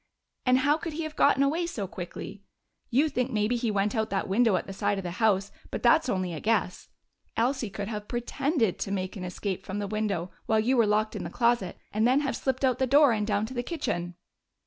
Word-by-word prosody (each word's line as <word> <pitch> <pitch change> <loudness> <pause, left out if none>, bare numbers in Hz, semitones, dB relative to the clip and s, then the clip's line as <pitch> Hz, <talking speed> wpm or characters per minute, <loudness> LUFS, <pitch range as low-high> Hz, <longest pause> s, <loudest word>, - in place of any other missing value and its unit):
And 255 0 +6
how 285 +3 +3
could 325 0 -5
he 325 +2 -3
have 310 -1 -6
gotten 275 - +4
away 325 +5 +1
so 230 -12 -4
quickly? 190 +2 -7 0.5
You 275 +6 +3
think 250 -3 -1
maybe 215 0 +1
he 235 -1 -1
went 205 0 +1
out 220 -2 0
that 195 - -1
window 220 +1 +3
at 180 - -1
the 195 - -7
side 205 +1 0
of 195 - -4
the 175 - -4
house, 200 -3 +2 0.2
but - - -5
that's 320 -4 +5
only 185 -5 -1
a 155 - -4
guess. 215 -3 -1 0.5
Elsie 245 0 +1
could 200 0 -5
have 210 -1 -5
pretended 240 - 0
to - - -3
make 185 +1 -2
an 190 - -6
escape 185 +1 -4
from 190 - -5
the 205 - -2
window 200 -4 -2 0.2
while 220 - +3
you 245 +5 +2
were 230 -3 +4
locked 215 +1 +1
in - - -4
the - - -4
closet 235 -6 +1 0.2
and 215 +2 +3
then 260 +3 +4
have 275 -3 -1
slipped 265 0 0
out 255 -2 +1
the 260 - +2
door 285 +1 +6
and 210 -2 0
down 205 0 +1
to 245 - -8
the 245 - -1
kitchen." 180 - -3
220 Hz, 235 wpm, -28 LUFS, 200-260 Hz, 0.5 s, And